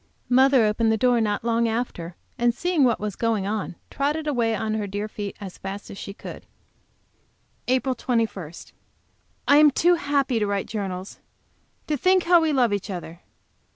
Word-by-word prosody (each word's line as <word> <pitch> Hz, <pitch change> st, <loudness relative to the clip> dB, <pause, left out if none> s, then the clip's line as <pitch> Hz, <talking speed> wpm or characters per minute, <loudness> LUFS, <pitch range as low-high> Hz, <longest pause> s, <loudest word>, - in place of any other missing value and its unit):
Mother 260 Hz, -1 st, +5 dB
opened 220 Hz, +1 st, +2 dB
the 220 Hz, -, +2 dB
door 245 Hz, +1 st, +3 dB
not 210 Hz, -1 st, -1 dB
long 230 Hz, 0 st, +1 dB
after, 220 Hz, -7 st, -3 dB, 0.2 s
and 240 Hz, -2 st, +1 dB
seeing 350 Hz, 0 st, +1 dB
what 240 Hz, -3 st, +3 dB
was 210 Hz, -2 st, -4 dB
going 225 Hz, -4 st, 0 dB
on, 205 Hz, -3 st, -3 dB, 0.2 s
trotted 295 Hz, +3 st, -1 dB
away 235 Hz, -6 st, +1 dB
on 215 Hz, 0 st, -2 dB
her 215 Hz, -2 st, -2 dB
dear 205 Hz, +2 st, -3 dB
feet 205 Hz, -2 st, -6 dB
as 195 Hz, -3 st, -9 dB
fast 195 Hz, +1 st, -7 dB
as -, -, -9 dB
she -, -, -6 dB
could. 195 Hz, -, -10 dB, 1.2 s
APRIL 260 Hz, +1 st, +1 dB
21. 225 Hz, -10 st, -2 dB, 1.0 s
I 285 Hz, -, +6 dB
am 300 Hz, 0 st, +8 dB
too 340 Hz, +6 st, +3 dB
happy 285 Hz, -7 st, +1 dB
to 210 Hz, -, 0 dB
write 200 Hz, -1 st, -1 dB
journals. 195 Hz, -3 st, -5 dB, 0.7 s
To 300 Hz, -, -1 dB
think 370 Hz, +5 st, +3 dB
how 345 Hz, 0 st, +5 dB
we 320 Hz, -1 st, +1 dB
love 245 Hz, -6 st, +2 dB
each 200 Hz, +1 st, -3 dB
other. 175 Hz, -2 st, -7 dB
230 Hz, 175 wpm, -24 LUFS, 205-270 Hz, 1.2 s, am